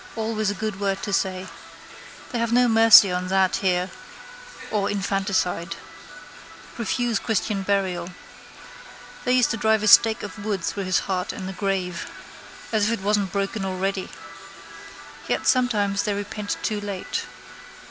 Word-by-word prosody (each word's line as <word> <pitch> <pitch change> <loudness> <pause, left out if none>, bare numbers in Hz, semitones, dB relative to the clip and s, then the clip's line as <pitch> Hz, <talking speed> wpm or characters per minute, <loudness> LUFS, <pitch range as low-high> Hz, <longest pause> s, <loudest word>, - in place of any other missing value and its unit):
Always 220 -2 -1
a 205 - -2
good 215 -1 -4
word 195 -1 -1
to 200 - -3
say. 185 -1 -1 0.9
They 240 - -2
have 230 0 -1
no 245 +1 +4
mercy 225 -3 +8
on 180 0 -2
that 190 0 +2
here 180 -1 0 0.8
or 205 -2 0
infanticide. 190 -4 -1 1.0
Refuse 235 -1 0
christian 210 -2 -1
burial. 190 -3 -1 1.2
They 250 - +2
used 250 -2 +3
to 225 - -2
drive 220 -1 +2
a - - +1
stake 220 +1 +6
of 205 0 -8
wood 200 -4 -2
through 200 +3 -3
his 185 - +1
heart 190 +2 -2
in 190 - -7
the 190 - -5
grave. 185 -3 -3 0.6
As 215 -2 +2
if - - +1
it - - -12
wasn't 205 -2 +1
broken 200 +1 -2
already. 190 0 -2 1.2
Yet - - -1
sometimes 210 -6 +2
they 205 -2 -1
repent 205 0 -4
too 210 -1 -1
late. 200 -2 -4
200 Hz, 145 wpm, -23 LUFS, 190-220 Hz, 1.2 s, mercy